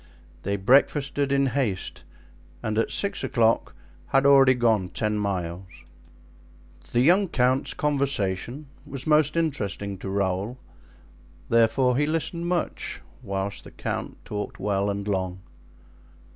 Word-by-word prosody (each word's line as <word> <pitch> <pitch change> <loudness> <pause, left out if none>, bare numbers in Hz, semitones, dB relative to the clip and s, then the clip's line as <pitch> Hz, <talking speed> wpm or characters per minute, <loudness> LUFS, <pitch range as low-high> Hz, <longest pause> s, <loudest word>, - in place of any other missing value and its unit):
They 100 +1 -1
breakfasted 140 +5 +2
in 140 0 +3
haste, 125 -8 -2 0.6
and 110 0 0
at 115 - +1
six 200 - -1
o'clock 115 -1 +1 0.3
had 135 +1 +2
already 135 -2 +7
gone 110 -6 +2
ten 105 0 -1
miles. 95 -2 -3 1.2
The 120 - +3
young 185 +8 +5
count's 130 -2 +1
conversation 140 -3 -1 0.2
was 140 -3 -6
most 155 0 +3
interesting 100 - -2
to 95 - -5
Raoul, 100 +4 -1 0.9
therefore 115 +2 +3
he 145 +1 +2
listened 165 +2 -2
much, 175 -1 -2 0.2
whilst 100 0 -3
the - - -11
count - - -5
talked 105 -1 -5
well 100 0 0
and 100 0 -3
long. 95 -2 -2
120 Hz, 120 wpm, -25 LUFS, 100-140 Hz, 1.2 s, already